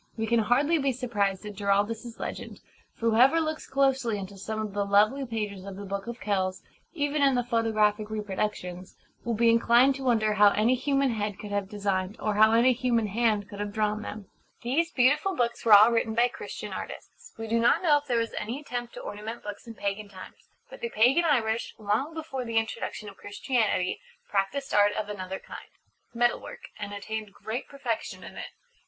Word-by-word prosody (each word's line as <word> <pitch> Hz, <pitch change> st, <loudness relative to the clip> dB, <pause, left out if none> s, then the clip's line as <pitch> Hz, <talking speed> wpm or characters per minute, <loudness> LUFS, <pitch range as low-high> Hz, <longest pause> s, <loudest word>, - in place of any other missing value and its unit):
We 225 Hz, -, -1 dB
can 235 Hz, +1 st, +2 dB
hardly 280 Hz, +9 st, +2 dB
be 275 Hz, -2 st, +1 dB
surprised 210 Hz, -6 st, -1 dB
at 210 Hz, -, -6 dB
Giraldus's 205 Hz, +4 st, -1 dB
legend; -, -, -6 dB, 0.4 s
for 230 Hz, 0 st, 0 dB
whoever 260 Hz, +9 st, +5 dB
looks 315 Hz, -1 st, -3 dB
closely 265 Hz, -5 st, +1 dB
into 200 Hz, 0 st, -7 dB
some 215 Hz, +3 st, -5 dB
of 215 Hz, -2 st, -4 dB
the 205 Hz, 0 st, 0 dB
lovely 215 Hz, +7 st, +3 dB
pages 210 Hz, -4 st, -4 dB
of 195 Hz, -1 st, -7 dB
the 200 Hz, +1 st, -7 dB
Book 200 Hz, +2 st, -4 dB
of 235 Hz, +1 st, -6 dB
Kells 190 Hz, -2 st, -1 dB, 0.3 s
even 290 Hz, -2 st, -1 dB
in 275 Hz, -2 st, +4 dB
the 245 Hz, -, +1 dB
photographic 215 Hz, -3 st, +1 dB
reproductions 195 Hz, -3 st, -4 dB, 0.3 s
will 235 Hz, -1 st, -1 dB
be 230 Hz, +1 st, +4 dB
inclined 235 Hz, +3 st, +5 dB
to 270 Hz, -, -7 dB
wonder 220 Hz, -4 st, +2 dB
how 205 Hz, 0 st, +6 dB
any 225 Hz, +4 st, +3 dB
human 275 Hz, 0 st, +1 dB
head 210 Hz, -3 st, -3 dB
could 210 Hz, -, -8 dB
have 200 Hz, -1 st, -2 dB
designed, 200 Hz, -2 st, -2 dB
or 215 Hz, -, -1 dB
how 215 Hz, +1 st, +6 dB
any 235 Hz, +3 st, +5 dB
human 240 Hz, -2 st, +1 dB
hand 210 Hz, -1 st, +1 dB
could 205 Hz, 0 st, -10 dB
have 205 Hz, 0 st, -3 dB
drawn 215 Hz, 0 st, 0 dB
them. 210 Hz, -1 st, -7 dB, 0.4 s
These 300 Hz, +8 st, +1 dB
beautiful 290 Hz, +9 st, +2 dB
books 235 Hz, -1 st, -1 dB
were 225 Hz, -, +6 dB
all 210 Hz, +3 st, +9 dB
written 230 Hz, -1 st, 0 dB
by 240 Hz, +1 st, +4 dB
Christian -, -, -7 dB
artists. -, -, -9 dB
We 225 Hz, -, -5 dB
do 230 Hz, +1 st, +1 dB
not 230 Hz, -, +3 dB
know 295 Hz, -4 st, +5 dB
if 290 Hz, -, -20 dB
there 245 Hz, -3 st, +1 dB
was 230 Hz, 0 st, -1 dB
any 230 Hz, +6 st, -4 dB
attempt 245 Hz, -4 st, -6 dB
to -, -, -7 dB
ornament 215 Hz, +3 st, -7 dB
books 205 Hz, +3 st, -8 dB
in 230 Hz, -, -8 dB
pagan 200 Hz, 0 st, -3 dB
times. 185 Hz, -2 st, -13 dB, 0.2 s
But -, -, -12 dB
the 235 Hz, -, -2 dB
pagan 250 Hz, +10 st, +4 dB
Irish, 230 Hz, -7 st, +1 dB
long 220 Hz, +9 st, -1 dB
before 310 Hz, -5 st, -4 dB
the 230 Hz, -1 st, -2 dB
introduction 225 Hz, -1 st, -2 dB
of 200 Hz, -, -10 dB
Christianity, 205 Hz, -3 st, -1 dB, 0.3 s
practised 210 Hz, +8 st, -1 dB
art 205 Hz, 0 st, +5 dB
of 210 Hz, -1 st, -3 dB
another 190 Hz, -2 st, -5 dB
kind -, -, -11 dB, 0.4 s
Metal 240 Hz, 0 st, +1 dB
work -, -, -10 dB
and 205 Hz, -1 st, -5 dB
attained 210 Hz, 0 st, -5 dB
great 225 Hz, +4 st, -5 dB
perfection 270 Hz, -5 st, -4 dB
in -, -, -10 dB
it. -, -, -6 dB
220 Hz, 200 wpm, -27 LUFS, 205-245 Hz, 0.4 s, all